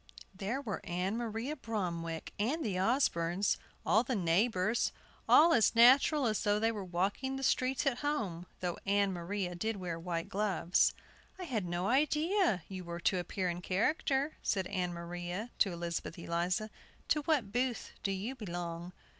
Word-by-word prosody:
There 200 +7 -3
were 215 -8 -4
Ann 180 +4 -2
Maria 235 +4 -3
Bromwick 170 - -4
and 270 +9 0
the 205 - -1
Osbornes, 190 -5 +2 0.3
all 220 - +5
the 255 0 -2
neighbors, 190 +4 +2 0.4
all 330 +2 +7
as 230 0 +4
natural 265 +5 +6
as 215 -2 +1
though 205 0 +3
they 225 +1 +2
were 210 -3 -5
walking 195 +9 -1
the 270 - -5
streets 260 +1 +1
at 255 -3 +1
home, 210 - -2
though 180 -1 -2
Ann 200 -1 +2
Maria 180 +1 -3
did 220 +6 -2
wear 175 -3 -4
white 170 -1 -3
gloves. 190 -4 +2 0.4
"I 375 - -6
had 230 - -2
no 175 +1 -2
idea 305 - +2
you 185 -2 -6
were 170 0 -6
to 185 +1 +2
appear 180 +2 -2
in 175 0 -3
character," 270 - 0
said 190 -3 0
Ann 180 -2 -2
Maria 175 +5 -5
to 195 - +4
Elizabeth 170 -1 -4
Eliza; 175 +5 -1 0.4
"to 300 - +3
what 270 -11 +1
booth 245 +1 -1
do 195 - -1
you 195 +7 -3
belong?" 175 -6 -5
200 Hz, 165 wpm, -33 LUFS, 175-245 Hz, 0.4 s, all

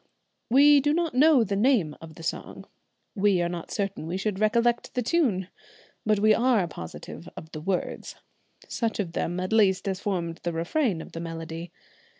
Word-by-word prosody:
We 285 +4 +7
do 290 +2 +1
not 335 -2 0
know 280 -1 +5
the 200 -2 -2
name 205 - +2
of 160 -1 -11
the 165 - -11
song; - - -5 0.5
we 200 -3 +2
are 175 - +1
not 175 -1 -6
certain 195 -6 -3
we 175 +3 -2
should 195 0 -2
recollect 235 +2 +1
the 250 - 0
tune; 225 - +1 0.6
but 215 -1 +4
we 215 +1 +5
are 235 -6 +2
positive 85 - -9
of 160 - -9
the 155 - -7
words, 185 +2 -3 0.5
such 230 -3 -2
of 185 -5 -2
them 175 +1 -2
at 185 +3 -2
least 200 -3 +3
as 190 -1 -1
formed 170 -5 -3
the 175 - -3
refrain 170 - 0
of - - -13
the 165 - -6
melody. 165 0 -6
195 Hz, 180 wpm, -26 LUFS, 170-235 Hz, 0.6 s, We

